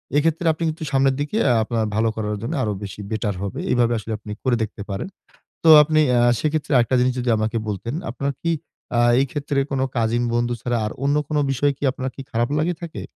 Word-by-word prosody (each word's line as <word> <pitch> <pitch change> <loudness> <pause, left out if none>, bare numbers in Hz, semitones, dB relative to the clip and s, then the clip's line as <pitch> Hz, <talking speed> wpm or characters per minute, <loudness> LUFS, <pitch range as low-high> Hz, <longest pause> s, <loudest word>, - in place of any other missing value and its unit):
এইক্ষেত্রে 165 +4 +1
আপনি 160 - -5
কিন্তু 155 +1 -5
সামনের 135 -1 +3
দিকে 150 +9 -2
আ - - +4
আপনার 110 0 -1
ভালো 110 +1 +2
করার 105 -1 -2
জন্য 115 +8 -3
আরো 105 - 0
বেশি 100 0 -7
বেটার 110 -2 -1
হবে। 100 - -4
এইভাবে 120 -1 +3
আসলে 110 - -7
আপনি 105 0 -9
করে 130 -2 +2
দেখতে 105 -1 -6
পারেন। 100 - -3 0.6
তো 165 - +5
আপনি 155 +1 +2 0.2
আ - - +4 0.2
সেইক্ষেত্রে 155 -1 -1
আরেকটা 125 +2 +2
জিনিস 125 0 +2
যদি 125 0 -1
আমাকে 110 +2 -1
বলতেন, 105 +4 -4 0.2
আপনার 140 +3 -2
কি 170 - 0 0.5
আ - - +4 0.2
এই 135 - +3
ক্ষেত্রে 145 -1 -1
কোনো 135 -1 0
কাজিন 115 +1 +1
বন্ধু 120 0 +1
ছাড়া 120 -1 -1
আর 105 - -3
অন্য 140 +1 +2
কোনো 150 -1 0
বিষয় 140 +2 +2
কি - - -9
আপনার 130 +1 -4
কি - - -7
খারাপ 120 +2 0
লেগে 170 +3 +1
থাকে? 170 - -6
125 Hz, 220 wpm, -22 LUFS, 110-145 Hz, 0.6 s, তো